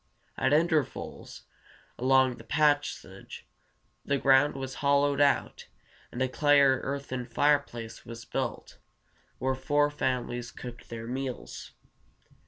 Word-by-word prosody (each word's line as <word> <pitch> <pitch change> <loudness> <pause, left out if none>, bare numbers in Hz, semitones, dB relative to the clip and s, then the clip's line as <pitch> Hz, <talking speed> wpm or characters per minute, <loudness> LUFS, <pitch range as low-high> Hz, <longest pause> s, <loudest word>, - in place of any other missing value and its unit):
At - - +1
intervals 155 -2 -1 0.6
along 130 0 +3
the - - -12
passage 150 -1 -1 0.6
the 140 - 0
ground 135 +2 +4
was 135 -1 -5
hollowed 140 0 +3
out, 140 -1 +1 0.4
and 125 - -2
a - - +1
clay 145 +2 +3
or 135 -2 +4
earthen 135 -2 -4
fireplace 120 -3 0
was 115 0 -9
built, - - -4 0.6
where 130 0 0
four 145 +3 +1
families 120 -3 -2
cooked 120 -1 -10
their 115 -1 -6
meals. 130 +1 -6
135 Hz, 115 wpm, -28 LUFS, 125-145 Hz, 0.6 s, ground